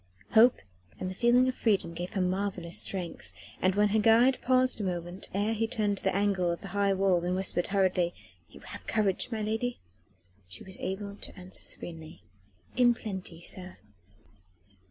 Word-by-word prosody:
Hope 235 Hz, +3 st, +6 dB, 0.4 s
and 185 Hz, -, -3 dB
the -, -, -5 dB
feeling 245 Hz, +5 st, +4 dB
of 255 Hz, -, +1 dB
freedom 205 Hz, -8 st, +1 dB
gave 175 Hz, +2 st, -5 dB
her 195 Hz, -, 0 dB
marvellous 185 Hz, -2 st, -1 dB
strength, 170 Hz, -, -4 dB, 0.3 s
and 185 Hz, 0 st, +3 dB
when 205 Hz, 0 st, +4 dB
her 220 Hz, +2 st, +2 dB
guide 230 Hz, +4 st, +5 dB
paused 255 Hz, -1 st, +2 dB
a -, -, -2 dB
moment 175 Hz, 0 st, -4 dB
ere 205 Hz, +3 st, 0 dB
he 225 Hz, +1 st, 0 dB
turned 205 Hz, -3 st, 0 dB
the 190 Hz, -, 0 dB
angle 195 Hz, -3 st, +2 dB
of 170 Hz, -, -2 dB
the 195 Hz, -, -8 dB
high 200 Hz, +1 st, +1 dB
wall 190 Hz, -2 st, +2 dB
and 180 Hz, +1 st, 0 dB
whispered 185 Hz, -2 st, 0 dB
hurriedly: 185 Hz, -3 st, +1 dB, 0.3 s
"You -, -, -14 dB
have -, -, -10 dB
courage, 210 Hz, +1 st, +1 dB
my 220 Hz, -2 st, -2 dB
lady?" 225 Hz, +3 st, -2 dB, 0.7 s
she 90 Hz, 0 st, -9 dB
was 190 Hz, 0 st, -10 dB
able 200 Hz, +2 st, -4 dB
to -, -, -9 dB
answer 185 Hz, 0 st, -8 dB
serenely: 160 Hz, -, -7 dB, 0.5 s
"In 240 Hz, -1 st, +5 dB
plenty, 185 Hz, -6 st, -6 dB
sir." 185 Hz, 0 st, -6 dB
195 Hz, 175 wpm, -29 LUFS, 180-220 Hz, 0.7 s, Hope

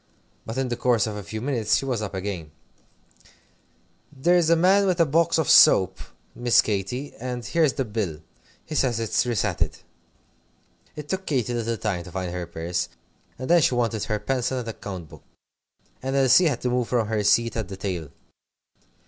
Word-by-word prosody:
But 115 Hz, +3 st, -5 dB
in 130 Hz, -1 st, -1 dB
the 120 Hz, -, -1 dB
course 120 Hz, -3 st, +2 dB
of 110 Hz, -2 st, -4 dB
a 105 Hz, -, -5 dB
few 110 Hz, +2 st, -6 dB
minutes 120 Hz, -5 st, +1 dB
she -, -, -3 dB
was 125 Hz, -5 st, -2 dB
up 100 Hz, -2 st, -5 dB
again. 95 Hz, -5 st, -4 dB, 1.6 s
"There's 170 Hz, +4 st, +2 dB
a 170 Hz, -, +6 dB
man 185 Hz, +4 st, +4 dB
come 200 Hz, -, +1 dB
with 180 Hz, -1 st, +1 dB
a 165 Hz, -, +5 dB
box 165 Hz, +4 st, +2 dB
of 160 Hz, -4 st, 0 dB
soap, 95 Hz, -1 st, +6 dB, 0.3 s
Miss 120 Hz, -1 st, +3 dB
Katy, 110 Hz, +7 st, -3 dB
and 125 Hz, -1 st, -5 dB
here's 155 Hz, +3 st, +2 dB
the 135 Hz, -, -2 dB
bill. 100 Hz, -8 st, -3 dB, 0.4 s
He -, -, -7 dB
says 125 Hz, -6 st, +1 dB
it's 115 Hz, +2 st, 0 dB
resated." 115 Hz, -6 st, -1 dB, 1.2 s
It 150 Hz, -1 st, -8 dB
took 190 Hz, +3 st, -4 dB
Katy 125 Hz, -4 st, 0 dB
a -, -, -1 dB
little 115 Hz, 0 st, -2 dB
time 100 Hz, -6 st, -2 dB
to 90 Hz, -, -10 dB
find 95 Hz, -1 st, -4 dB
her 90 Hz, -1 st, -4 dB
purse, 85 Hz, +1 st, -3 dB, 0.5 s
and 130 Hz, -, -6 dB
then 175 Hz, 0 st, +5 dB
she 130 Hz, -, +2 dB
wanted 115 Hz, -3 st, 0 dB
her 105 Hz, -, -1 dB
pencil 125 Hz, +4 st, -1 dB
and 120 Hz, -2 st, -4 dB
account 95 Hz, -6 st, -7 dB
book, -, -, -14 dB, 0.8 s
and 135 Hz, +1 st, -2 dB
Elsie 135 Hz, +6 st, +5 dB
had 135 Hz, -6 st, -1 dB
to 125 Hz, -, -1 dB
move 125 Hz, -1 st, 0 dB
from 120 Hz, -4 st, 0 dB
her 110 Hz, -1 st, -1 dB
seat 115 Hz, +3 st, +3 dB
at 110 Hz, -4 st, -3 dB
the 95 Hz, 0 st, -8 dB
table. 90 Hz, -6 st, -4 dB
120 Hz, 190 wpm, -24 LUFS, 100-135 Hz, 1.6 s, a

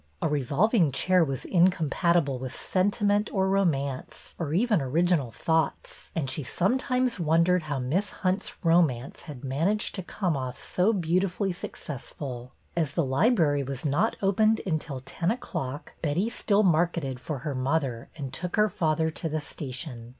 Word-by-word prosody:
A -, -, +1 dB
revolving 150 Hz, -, +2 dB
chair 180 Hz, +6 st, +3 dB
was 135 Hz, -4 st, -3 dB
incompatible 170 Hz, -4 st, +2 dB
with 130 Hz, 0 st, -6 dB
sentiment 205 Hz, +2 st, +1 dB
or 190 Hz, -1 st, +1 dB
romance 140 Hz, -9 st, -1 dB
or 160 Hz, -4 st, -2 dB
even 205 Hz, +1 st, +2 dB
Original 155 Hz, 0 st, +1 dB
Thoughts, 160 Hz, +5 st, -1 dB
and 155 Hz, -5 st, -1 dB
she 130 Hz, +3 st, -3 dB
sometimes 250 Hz, -, 0 dB
wondered 170 Hz, +2 st, +3 dB
how 150 Hz, -3 st, -3 dB
Miss 155 Hz, +11 st, 0 dB, 0.2 s
Hunt's 190 Hz, +2 st, 0 dB
romance 160 Hz, -7 st, +2 dB
had 140 Hz, -3 st, -8 dB
managed 165 Hz, +11 st, 0 dB
to 190 Hz, -, -3 dB
come 180 Hz, -2 st, -2 dB
off 130 Hz, -2 st, -4 dB
so 185 Hz, +5 st, +1 dB
beautifully 185 Hz, +1 st, 0 dB
successful. 130 Hz, -6 st, -7 dB, 0.2 s
As 160 Hz, -5 st, 0 dB
the 170 Hz, -2 st, +1 dB
library 145 Hz, -, +3 dB
was 135 Hz, +1 st, -4 dB
not 145 Hz, +11 st, +2 dB
opened 215 Hz, +3 st, +3 dB
until 155 Hz, -6 st, -2 dB
ten 165 Hz, +6 st, -2 dB
o'clock, 145 Hz, -, -4 dB
Betty 170 Hz, +9 st, 0 dB
still 210 Hz, -2 st, +2 dB
marketed 165 Hz, -7 st, +1 dB
for 150 Hz, +3 st, -4 dB
her 145 Hz, +3 st, -4 dB
mother 130 Hz, -2 st, -1 dB
and 135 Hz, -4 st, -5 dB
took 180 Hz, +5 st, -3 dB
her 210 Hz, 0 st, +4 dB
father 160 Hz, -2 st, 0 dB
to 165 Hz, +1 st, -4 dB
the 155 Hz, +1 st, -1 dB
station. 130 Hz, -4 st, -6 dB
160 Hz, 150 wpm, -27 LUFS, 135-185 Hz, 0.2 s, her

